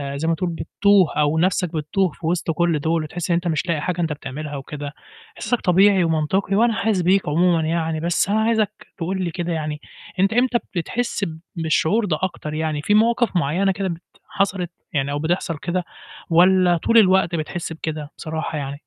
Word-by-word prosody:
زي 150 +3 -2
ما 165 - +2
تقول 180 +1 -2
بتتوه 195 +2 +2
أو 150 +1 +2
نَفْسك 180 -1 +1
بتتوه 165 +4 0
في 160 - -11
وِسط 170 -1 0
كلّ 170 -1 +1
دُول 160 +2 0
وتحس 170 +3 -5
إن - - +4
أنت 175 +1 -1
مش 165 +2 -1
لاقي 160 -3 0
حاجة 175 0 -2
أنت 160 -2 0
بتعملها 145 +1 -6
وكده، 145 +1 -6 0.4
إحساسك 245 - -1
طبيعي 190 +1 +4
ومنطقي 165 +5 0
وأنا 230 +2 +3
حاسس 210 -4 0
بيك 185 +3 +2
عمومًا 170 +2 +3
يعني، 160 -1 -1
بس 170 +3 0
أنا 215 +2 +2
عايزك 220 -2 +2 0.3
تقول 185 +3 -2
لي 170 - -2
كده 175 0 -3
يعني 150 -1 -3 0.4
أنت 195 +3 +3
إمتى 245 +1 +3 0.2
بتحس 210 +4 -2 0.3
بالشعور 165 +6 +1
ده 155 -6 0
أكتر 155 -4 -3
يعني، 155 -1 -2
في 205 - +1
مواقف 230 0 +3
معيّنة 175 +6 +1
كده 195 0 -2
بت 170 -1 -5 0.3
حصلِت، 185 -3 -1 0.2
يعني 140 -2 0
أو 145 - -2
بتحصل 165 +1 -1
كده؟ 175 +4 -2 0.5
والّا 180 +1 +5
طول 230 +7 +2
الوقت 190 -4 +4
بتحس 165 +1 -4
بكده 155 -2 -5
بصراحة 160 0 -4
يعني؟ 140 -1 -4
170 Hz, 190 wpm, -21 LUFS, 155-190 Hz, 0.5 s, والّا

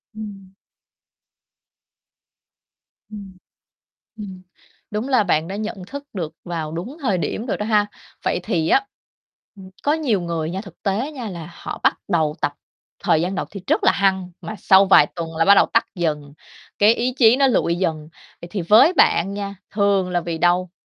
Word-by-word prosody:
Ừm. 200 -3 -9 2.6
Ừm. 200 -3 -10 0.8
Ừm, 190 -4 -9 0.5
đúng 215 +5 -3
là 255 -5 +4
bạn 165 -3 +1
đã 195 - -5
nhận 210 -3 -5
thức 280 +6 -8
được 170 -6 -4
vào 165 -3 -4
đúng 185 - -6
thời 205 -9 +1
điểm 220 +7 -3
rồi - - -1
đó 210 - -4
ha. 210 -2 +3 0.4
Vậy - - 0
thì 160 -2 -1
á, 405 - +3 0.7
ừm, 190 -1 -12
có 290 - +2
nhiều 275 -11 0
người 165 -2 -3
nha, 190 +2 -4
thực 195 -5 -14
tế 220 +9 -1
nha, 250 -7 -6
là 170 -3 -8
họ - - -7
bắt - - +4
đầu 160 -5 +1
tập - - 0 0.5
thời 155 - +3
gian 180 +3 -2
đầu 185 - -3
thì 200 - -8
rất - - +1
là - - +5
hăng 190 -2 0
mà 215 - -7
sau 195 +1 +5
vài 185 -6 +7
tuần 165 -1 -5
là 165 - +3
bắt 200 - +7
đầu - - +5
tắt 230 - +3
dần, 150 -5 -2 0.5
cái 210 +3 +5
ý 245 +2 -1
chí 230 -1 +6
nó 275 0 +4
lụi 170 -9 +1
dần. 160 -4 -2 0.3
Vậy 170 - -9
thì 195 -2 -3
với 215 - +6
bạn 195 - +3
nha, 200 -1 -5 0.2
thường 200 -3 +1
là 175 -1 0
vì 165 -1 -4
đâu? 175 +1 +2
195 Hz, 185 wpm, -21 LUFS, 170-215 Hz, 2.6 s, vài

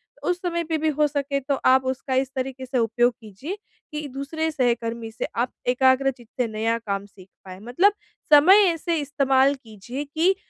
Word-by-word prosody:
तो - - -5
उस 360 0 -1
समय 340 -1 -1
पे 320 -1 -1
भी 315 0 0
हो 300 0 +2
सके 280 -1 -2
तो 280 +1 -1
आप 260 0 +5
उसका 260 0 -2
इस 265 0 0
तरीके 260 0 -4
से 255 0 -2
उपयोग 240 +1 +2
कीजिए, 225 - -7 0.3
कि 300 0 -5
दूसरे 280 +4 -3
सहकर्मी 235 -4 -1
से 220 - -4
आप 240 +2 0 0.2
एकाग्र 260 +2 +3
चित्त 240 -3 -18
से 245 - +1
नया 225 +1 -1
काम 200 -3 -4
सीख 195 -2 -17 0.2
पाएँ। 185 0 -10
मतलब 250 - +2 0.4
समय 370 +8 +8
ऐसे 335 +1 -2
इस्तेमाल 275 -1 +2
कीजिए 240 +2 -8
कि 320 +6 +1
265 Hz, 190 wpm, -24 LUFS, 235-300 Hz, 0.4 s, समय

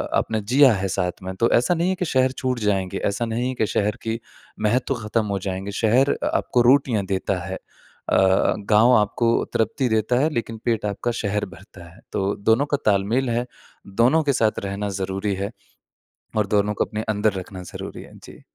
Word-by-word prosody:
आपने 110 -1 0
जिया 130 +6 +5
है 95 -1 -1
साथ 90 -1 0
में। 95 0 -5
तो 115 - +3
ऐसा 125 +9 +3
नहीं 170 +2 +1
है 190 - +1
कि 180 -1 -2
शहर 130 -3 +2
छूट 130 -2 -1
जाएँगे, 100 -4 0
ऐसा 100 +4 0
नहीं 115 +2 -2
है - - -2
कि 110 - +1
शहर 105 +1 0
की 115 0 -2 0.4
महत्व 125 +5 +1
खत्म 105 +1 0
हो 100 -1 -1
जाएँगे। 95 +1 -4
शहर 120 +7 +3
अ, - - -2
आपको 125 - +1
रोटियाँ 120 -5 +3
देता 95 0 -1
है। 95 0 -4
अ, - - -8 0.6
गाँव 105 +5 +4
आपको 110 +3 +1 0.2
तृप्ति 115 +4 0
देता 110 +2 +1
है 150 +4 +2
लेकिन 115 -2 -3
पेट 115 -3 0
आपका 105 +4 -2
शहर 105 0 -1
भरता 90 0 -15
है। - - -18
तो 100 +1 0
दोनों 120 +6 +4
का - - +4
तालमेल 110 +6 +2
है, 120 +1 0 0.4
दोनों 120 +11 +3
के 140 -2 +1
साथ 110 -4 +1
रहना 100 +1 -3
ज़रूरी 95 +2 -2
है 100 +3 -4 0.9
और 105 - +2
दोनों 105 0 +1
को - - +1
अपने 105 +2 -4
अंदर 105 -1 +1
रखना 95 -1 -7
ज़रूरी - - -7
है। - - -15
जी। - - -13
110 Hz, 195 wpm, -23 LUFS, 100-120 Hz, 0.9 s, जिया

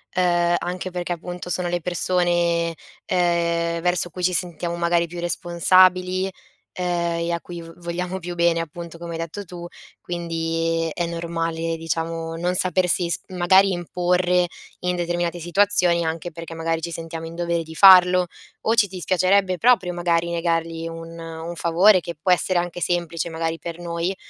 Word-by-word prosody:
uhm, 175 -1 +2
anche 180 +1 -4
perché 175 0 -3
appunto 180 +1 -7
sono 180 0 -1
le 175 0 -1
persone, 175 -1 +1 0.3
ehm, 170 -1 +1
verso 175 -1 0
cui 180 +2 -7
ci 180 0 +2
sentiamo 170 0 -2
magari 170 0 +1
più 175 +1 -8
responsabili, 185 +2 +3 0.4
ehm, 175 -1 -1 0.2
e 170 - -1
a 170 - -2
cui 175 -1 -8
vo 165 0 -11
vogliamo 175 +2 -4
più 175 0 -6
bene 170 -1 +2
appunto 170 +1 -7
come 170 -1 -6
hai - - -4
detto 165 +5 -5
tu. 175 0 -9 0.3
Quindi 165 -1 -2
è 170 -1 -2
normale, 165 -1 -2
diciamo 165 0 -3
non 180 +2 0
sapersi 180 -1 +1
s - - -1
magari 190 +2 +4
imporre 180 0 +1 0.4
in 180 0 0
determinate 175 0 -2
situazioni, 175 -1 +3
anche 165 +2 -3
perché 165 0 -8
magari 165 0 -2
ci 170 +1 -4
sentiamo 165 0 -6
in 165 - -8
dovere 170 -1 -1
di 160 0 -11
farlo, 180 -1 +7 0.3
o 225 - +1
ci 225 -3 +5
dispiacerebbe 185 +1 +1
proprio 210 -6 +3
magari 170 -1 0
negargli 165 -1 -1
un 165 0 -8
un 165 +1 -7
favore, 180 +4 +5
che 170 0 -6
può 175 +5 0
essere 180 0 +2
anche 175 0 -4
semplice 170 -1 -1
magari 165 0 -2
per 170 0 -7
noi, 170 +2 -2
175 Hz, 165 wpm, -22 LUFS, 165-180 Hz, 0.4 s, farlo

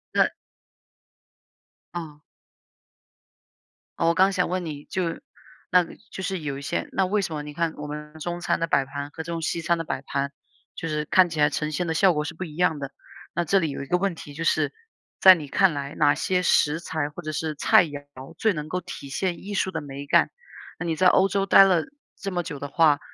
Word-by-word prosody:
那 - - +4 1.6
啊。 155 -4 -7 1.8
哦， 165 - +2
我 - - +3
刚 190 +3 +4
想 180 -2 0
问 180 0 -2
你 150 -2 -6
就 185 - -2 0.7
那 180 0 +5
个 165 - -11 0.2
就 190 - -6
是 190 -1 -2
有 145 -3 -4
一 - - -7
些 140 - -2
那 190 - +1
为 205 +3 +1
什 175 -4 -3
么 150 -1 -4
你 150 0 -8
看 165 +1 -1
我 150 - -6
们 150 0 -7
中 175 +2 -4
餐 - - 0
的 165 - 0
摆 140 -3 +2
盘 140 +1 -6
和 160 - -6
这 170 - -6
种 165 -1 -3
西 165 +1 -1
餐 170 +1 +1
的 165 - -3
摆 - - -3
盘， 140 0 -2 0.4
就 165 - -4
是 150 -1 -2
看 180 +4 +5
起 160 -2 -5
来 150 0 +5
呈 150 +1 -2
现 165 +4 -1
的 165 - 0
效 185 +2 +4
果 150 -1 -1
是 160 - -5
不 165 - -6
一 155 -4 -8
样 165 -3 +2
的。 140 -1 -5 0.4
那 170 +1 0
这 195 +5 +3
里 165 -4 0
有 140 - -5
一 - - -7
个 180 - +2
问 195 0 0
题 145 -2 -10
就 160 +3 -5
是 - - +1 0.5
在 190 -1 +10
你 155 -4 -7
看 180 +5 +3
来， 140 0 -4
哪 145 - +4
些 180 +4 0
食 160 -3 +3
材 155 -3 -3
或 150 +4 -9
者 155 -2 -4
是 155 +1 -2
菜 160 - +5
肴 145 -2 -7 0.4
最 220 -2 +2
能 150 -2 -5
够 180 +2 -2
体 155 -5 -8
现 175 +5 -2
艺 205 +1 -6
术 190 -1 0
的 160 -3 -3
美 140 -1 -7
感。 - - +4 0.5
那 175 - -3
你 165 -1 0
在 185 +3 +4
欧 190 +1 +5
洲 195 0 0
待 195 - +8
了 180 -4 +3 0.3
这 195 - -4
么 175 -1 -1
久 150 -4 -6
的 145 - -5
话， 150 0 +4
165 Hz, 250 characters per minute, -25 LUFS, 150-180 Hz, 1.8 s, 在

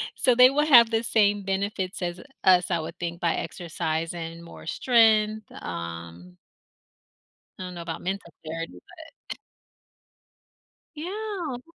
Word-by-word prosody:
so 250 - +3
they 250 +1 +8
will 295 +3 +1
have 235 -6 +7
the 225 0 +1
same 205 -3 +2
benefits 195 0 -2
as 175 0 -3 0.2
us, 180 -1 +4
I - - +1
would 160 - -7
think, 170 0 -4
by 170 -1 +1
exercising, 165 -1 -4
more 170 - -12
strength, 220 -1 +3 0.2
um 85 +1 -7 1.2
I - - -6
don't 180 0 -7
know 170 - -7
about 165 -1 -5
mental 190 -2 -4
clarity, 165 +1 -5
but 320 -2 -14 1.8
Yeah. 355 - -5
190 Hz, 130 wpm, -26 LUFS, 165-235 Hz, 1.8 s, they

